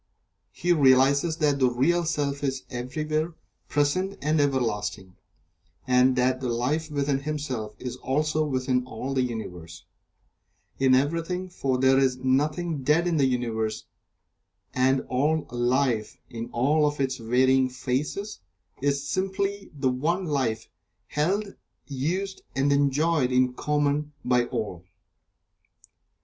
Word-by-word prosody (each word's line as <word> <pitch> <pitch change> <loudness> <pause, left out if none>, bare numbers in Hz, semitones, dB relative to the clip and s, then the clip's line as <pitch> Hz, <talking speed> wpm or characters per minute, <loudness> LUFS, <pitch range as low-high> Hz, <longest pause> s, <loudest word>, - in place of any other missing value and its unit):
He 175 - +1
realizes 140 +2 +4
that 145 -3 +1
the 130 -1 +4
Real 165 +8 +1
Self 145 -3 -1
is 135 -2 -2
everywhere 155 +6 -2 0.3
present 185 +7 0
and 155 +1 +1
everlasting, 105 -8 -1 0.7
and 125 0 +4
that 130 +1 +1
the 125 - -2
Life 140 +7 -1
within 140 -2 0
himself 135 -7 -4
is 125 -1 -6
also 155 +4 0
within 130 -3 0
all 130 +3 -5
the 130 - +2
Universe 90 -9 -6 0.9
in 130 -1 +5
everything, 170 +7 -1
for 135 -7 -1
there 130 +1 +4
is 130 -2 +2
nothing 150 +5 0
dead 150 +6 +3
in 170 -2 +1
the 135 -2 +4
Universe, 115 -4 -2 0.9
and 130 +1 +2
all 150 +5 0
Life, 120 -2 0
in 115 0 -6
all 150 +5 +2
of 145 0 -3
its 130 -1 0
varying 130 +2 +3
phases, 135 +11 -3 0.4
is 140 0 0
simply 195 +3 -2
the 135 -3 0
One 165 +9 -1
Life, 125 -8 -1 0.4
held, 195 +7 0 0.3
used 175 +8 -3
and 140 +1 +2
enjoyed 140 0 +2
in 125 0 +3
common 150 +1 0
by 125 -1 +3
all. 110 -8 -4
135 Hz, 125 wpm, -26 LUFS, 125-155 Hz, 0.9 s, in